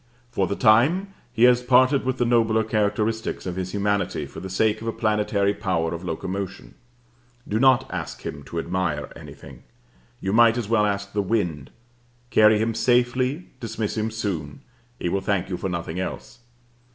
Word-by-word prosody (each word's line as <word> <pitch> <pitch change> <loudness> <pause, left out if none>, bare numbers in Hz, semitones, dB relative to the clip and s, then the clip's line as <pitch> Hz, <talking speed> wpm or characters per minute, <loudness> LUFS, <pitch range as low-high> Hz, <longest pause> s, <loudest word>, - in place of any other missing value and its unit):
For 95 -5 0
the 100 - -2
time 145 - +3 0.2
he 120 -1 +1
has 125 0 +6
parted 130 +2 +4
with 130 0 -1
the 120 - +1
nobler 115 -2 +3
characteristics 110 +1 -1
of 90 -2 -4
his 95 0 -3
humanity 100 -6 -1
for - - -10
the 95 - -7
sake 110 +3 +1
of 115 - -6
a - - +1
planetary 105 -2 +1
power 90 -6 -1
of 85 +1 -6
locomotion. 95 +3 -5 0.7
Do 110 - 0
not 130 0 +4
ask - - -5
him - - -6
to 85 - -7
admire 85 -4 -2
anything. - - -12 0.6
You 95 - -2
might 115 +1 +5
as 120 -4 -3
well 105 -2 +3
ask 100 0 -3
the 105 - +1
wind. 90 -9 -1 0.6
Carry 110 0 +6
him 110 +2 0
safely, 125 +7 +1
dismiss 110 -3 -3
him 110 0 -1
soon: 90 -10 -4 0.4
he - - -3
will 95 +3 0
thank 100 -2 -1
you 90 - -3
for 95 - -3
nothing 85 0 -4
else. 95 - -6
105 Hz, 175 wpm, -24 LUFS, 95-115 Hz, 0.7 s, has